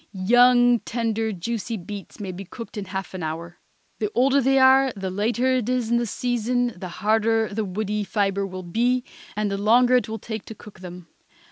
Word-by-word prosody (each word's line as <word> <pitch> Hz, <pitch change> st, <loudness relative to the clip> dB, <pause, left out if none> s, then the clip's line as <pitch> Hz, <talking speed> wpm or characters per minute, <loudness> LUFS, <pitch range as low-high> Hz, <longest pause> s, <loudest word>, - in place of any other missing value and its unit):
Young, 245 Hz, +4 st, +5 dB
tender, 225 Hz, -1 st, -2 dB
juicy 220 Hz, +3 st, -4 dB
beets 200 Hz, +3 st, -9 dB
may 195 Hz, -3 st, -4 dB
be 185 Hz, +2 st, -7 dB
cooked 230 Hz, +6 st, -10 dB
in 205 Hz, -2 st, -4 dB
half 190 Hz, 0 st, -5 dB
an 185 Hz, -, -5 dB
hour. 165 Hz, +2 st, -5 dB, 0.4 s
The 210 Hz, -, -1 dB
older 270 Hz, +3 st, +4 dB
they 270 Hz, +1 st, +3 dB
are, 265 Hz, 0 st, +6 dB
the 190 Hz, -2 st, -4 dB
later 235 Hz, +6 st, +1 dB
it 245 Hz, -2 st, -2 dB
is 250 Hz, -3 st, 0 dB
in 235 Hz, -, +4 dB
the 235 Hz, 0 st, -1 dB
season, 245 Hz, +1 st, -1 dB
the 180 Hz, +1 st, -7 dB
harder 220 Hz, +3 st, +1 dB
the 220 Hz, +1 st, -1 dB
woody 210 Hz, +2 st, -2 dB
fibre 195 Hz, 0 st, 0 dB
will 185 Hz, -1 st, -7 dB
be, 240 Hz, +8 st, 0 dB, 0.3 s
and 210 Hz, -1 st, -1 dB
the 195 Hz, -, -2 dB
longer 245 Hz, +4 st, +5 dB
it 245 Hz, -, -2 dB
will 220 Hz, -, -3 dB
take 220 Hz, -2 st, -6 dB
to 220 Hz, -, -9 dB
cook 210 Hz, -1 st, -14 dB
them. 180 Hz, -1 st, -10 dB
220 Hz, 200 wpm, -24 LUFS, 195-245 Hz, 0.4 s, are